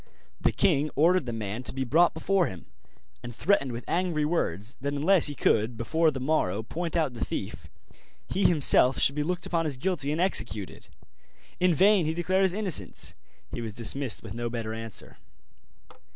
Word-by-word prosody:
The - - +1
king 155 -4 +1
ordered 165 -2 +3
the - - -2
man 110 0 -5
to 130 - -2
be 135 - -1
brought 160 +8 +3
before 180 +2 +1
him, 90 -3 -9 0.6
and 120 - -9
threatened 160 -7 +1
with 120 +1 -7
angry 170 -4 0
words 115 - -2
that 140 +1 -2
unless 165 +4 +4
he 145 - -5
could 115 -1 +1
before 160 +8 +1
the 135 -3 -5
morrow 125 -8 0
point 170 +8 -5
out 155 -6 0
the 115 - -5
thief, - - -5 0.6
he 195 - -1
himself 135 -5 +5
should 140 - +3
be 150 - -2
looked 175 +4 -2
upon 165 -2 -1
as 140 -4 -2
guilty 145 -2 -2
and 155 - -2
executed. 110 - -1 0.7
In 180 -2 +3
vain 190 -1 +4
he 160 - -2
declared 185 +3 0
his 190 -2 +3
innocence; 185 - +2 0.4
he 120 - -5
was 110 -3 -6
dismissed 120 +2 -1
with 100 - -8
no 120 +1 -4
better 115 -2 -4
answer. 115 -1 -7
145 Hz, 180 wpm, -27 LUFS, 120-175 Hz, 0.7 s, himself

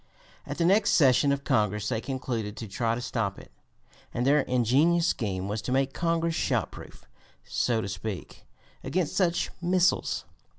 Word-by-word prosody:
At 145 - -5
the 170 - +1
next 200 +4 +4
session 140 -1 +5
of 140 0 -1
Congress 105 -6 +1
they 110 -2 -1
concluded 120 -6 -4
to 115 - -6
try 115 +3 -1
to 120 - -4
stop 110 -6 -2
it, - - -13 0.6
and 120 - -2
their 145 +2 +5
ingenious 135 +7 +2
scheme 100 - -1
was 105 0 -3
to 105 - -4
make 135 +1 +1
Congress 165 0 0
shot - - 0
proof, - - -12 0.4
so 115 -2 0
to 100 - -4
speak, 95 0 -6 0.4
against 175 -3 -1
such 175 -2 +1
missiles. 180 +1 +1
130 Hz, 165 wpm, -27 LUFS, 110-165 Hz, 0.6 s, session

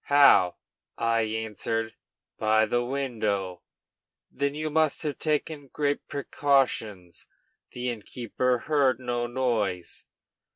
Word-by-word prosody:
'How?' 140 -11 +6 0.4
I 115 0 +2
answered, 110 0 -2 0.5
'By 110 0 +4
the 120 +2 0
window.' 110 -9 -2 0.7
'Then 140 +1 -1
you 155 0 -3
must 155 0 +1
have 150 -2 -3
taken 150 -1 -1
great 145 +1 -2
precautions; 130 - 0 0.5
the 125 0 -2
innkeeper 120 +2 -2
heard 140 -5 +2
no 120 -1 -2
noise.' 110 -8 -2
120 Hz, 100 wpm, -27 LUFS, 110-140 Hz, 0.7 s, How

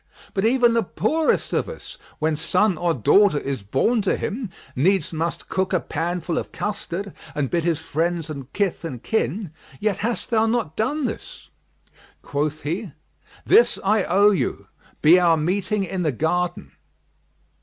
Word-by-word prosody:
But 195 +1 0
even 240 0 +4
the 230 - +3
poorest 315 - 0
of - - 0
us, - - -10 0.2
when 155 0 0
son 185 +5 +2
or 175 +2 0
daughter 165 - +4
is 135 -4 -3
born 135 - +1
to 195 - +1
him, 225 0 -3 0.3
needs 170 +4 +2
must 165 +1 -3
cook 190 0 -1
a 185 - +3
pan 175 +2 -3
full 165 0 -1
of - - -7
custard[FN#38] 200 -2 -4 0.2
and 145 -3 -1
bid 170 -1 +1
his 170 -2 +1
friends 165 +1 -1
and 140 -4 -7
kith 200 -5 -1
and 130 -8 -6
kin; 210 -5 -1 0.3
yet 210 -3 0
hast 230 +4 -3
thou 225 -1 +3
not 225 -9 -1
done 275 +7 0
this." - - -7 0.7
Quoth 150 +2 -2
he, 175 +2 -3 0.5
"This 450 +5 +5
I 205 +1 +3
owe 205 +3 +5
you; 195 - -1 0.4
be 170 +4 +7
our 170 -2 +4
meeting 195 +5 0
in 190 0 -3
the 155 -4 +1
garden." 175 +7 -1
180 Hz, 165 wpm, -23 LUFS, 160-210 Hz, 0.7 s, be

